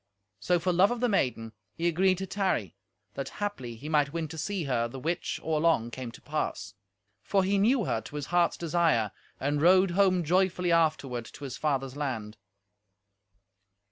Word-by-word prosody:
So, 175 - +2
for 175 +2 0
love 185 +4 +5
of 245 - -2
the 245 - +2
maiden, 125 - 0 0.2
he 170 - 0
agreed 185 +2 +3
to 190 - -3
tarry, 190 - -1 0.4
that 135 - -4
haply 165 - -4
he 135 +7 -9
might 150 -2 +2
win 165 0 -3
to 160 - -8
see 200 +1 -2
her, 125 -4 0
the 120 - -9
which, 165 +6 -2
or 160 -1 0
long, 155 -9 +2
came 125 -1 -6
to - - -13
pass; 145 - -3 0.5
for 195 -1 +1
he 195 +1 +1
knew 230 +2 +3
her 115 - -1
to 145 - -11
his 145 -1 -3
heart's 175 -1 +3
desire, 165 - +1 0.3
and 145 +1 0
rode 185 +2 +5
home 185 -1 +3
joyfully 180 +1 +1
afterward 150 -7 +1
to 145 - -12
his 135 -3 -5
father's 135 -3 -1
land. 115 -7 -4
160 Hz, 180 wpm, -28 LUFS, 130-185 Hz, 0.5 s, love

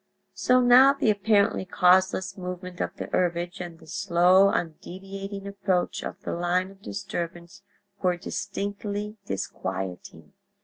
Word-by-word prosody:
So 255 0 +3
now 250 +3 +7
the 235 -6 +2
apparently 205 0 +2
causeless 190 +1 +3
movement 180 -1 -6
of - - -3
the - - -5
herbage, 175 0 0
and 170 -2 -7
the - - -17
slow, 180 +3 +4
undeviating 195 +4 -5
approach 195 -2 -1
of - - -6
the - - -4
line 180 +2 0
of 195 0 -19
disturbance 175 -4 -6 0.4
were 180 -1 +1
distinctly 205 +3 -4
disquieting. 95 -1 -5
185 Hz, 125 wpm, -26 LUFS, 175-200 Hz, 0.4 s, now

